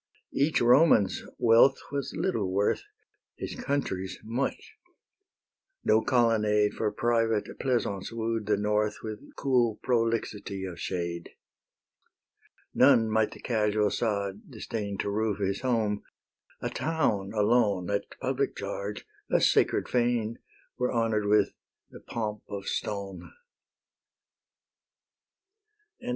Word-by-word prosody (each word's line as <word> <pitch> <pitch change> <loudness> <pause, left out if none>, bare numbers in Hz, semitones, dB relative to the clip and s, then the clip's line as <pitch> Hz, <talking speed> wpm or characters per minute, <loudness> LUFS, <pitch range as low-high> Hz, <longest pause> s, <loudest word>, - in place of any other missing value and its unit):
Each 145 +3 +2
Roman's 120 - +5 0.2
wealth 120 +4 +5
was 140 -1 -3
little 110 - -1
worth, 100 +2 +1 0.6
His - - -5
country's 140 - -2
much; 120 +5 -3 1.1
no 110 - +4
colonnade 110 -5 +2
For 105 -2 -1
private 115 -2 +1
pleasance 115 -7 -1
wooed 115 -2 -2
the 105 -1 +2
North 105 +1 0
With 110 -1 -5 0.2
cool 125 -5 +2
"prolixity 115 -5 -1
of 90 -2 -7
shade." 85 -2 -3 1.4
None 115 -4 +5
might 110 0 +2
the - - -12
casual 105 -3 +1
sod 100 -2 -2
disdain 100 -3 -4
To 100 - -2
roof 105 -1 0
his 100 -1 -1
home; 110 -5 0 0.6
a - - -2
town 120 -12 0
alone, 105 -4 +2
At 100 - 0
public 135 +1 -1
charge, 100 +1 -5 0.2
a - - +3
sacred - - +3
fane 120 -2 0 0.4
Were 125 - +1
honour'd 115 -3 +1
with 105 -1 +3 0.4
the - - -11
pomp 105 -2 -4
of 100 -1 -5
stone. 100 -2 -4 2.7
XVI. 245 - -5
110 Hz, 110 wpm, -28 LUFS, 100-120 Hz, 2.7 s, Roman's